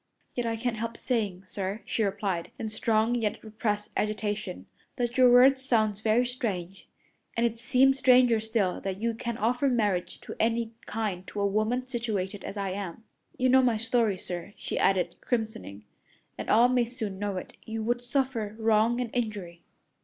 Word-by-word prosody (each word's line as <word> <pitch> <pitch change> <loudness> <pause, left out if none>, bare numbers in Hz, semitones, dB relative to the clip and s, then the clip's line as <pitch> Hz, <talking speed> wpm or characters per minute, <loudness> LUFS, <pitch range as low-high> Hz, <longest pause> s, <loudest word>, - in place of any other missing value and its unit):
"Yet 245 -1 -2
I 225 - 0
can't 230 0 -2
help 230 +1 -4
saying, 205 -7 -1
sir," 195 +2 -4
she - - -1
replied, 195 -3 -1
in 220 -1 -4
strong, 220 +1 +1
yet 225 -4 -1
repressed 215 -1 -2
agitation, 210 - -2 0.3
"that 240 -1 -2
your 255 -1 +6
words 260 +2 +7
sound 215 -6 +1
very 225 +3 +3
strange; 195 -7 -4 0.5
and 235 - +3
it 230 -1 -1
seems 265 +3 +3
stranger 250 -3 +5
still 220 -4 -1
that 195 0 -3
you 230 +1 0
can 235 +1 -4
offer 245 +5 +1
marriage 205 -7 0
of - - -6
any 230 0 +1 0.2
kind 205 -4 -3
to 210 - -6
a 200 - +2
woman 215 +5 0
situated 215 -6 -3
as 205 - -6
I 195 -1 -2
am. 195 +1 -5 0.3
You 255 0 +2
know 260 +1 +6
my 240 -3 +2
story, 225 -3 +1
sir," 180 +2 -6
she - - -3
added, 190 -2 +2
crimsoning, 220 - -3 0.5
"and - - -6
all 235 +3 +6
may 250 -1 +2
soon 220 -5 -5
know 200 -2 -2
it. - - -7
You 220 0 -3
would 240 +2 0
suffer 245 -4 -1
wrong 225 +1 +3
and 245 -3 -2
injury." 205 -8 -3
220 Hz, 175 wpm, -28 LUFS, 205-240 Hz, 0.5 s, words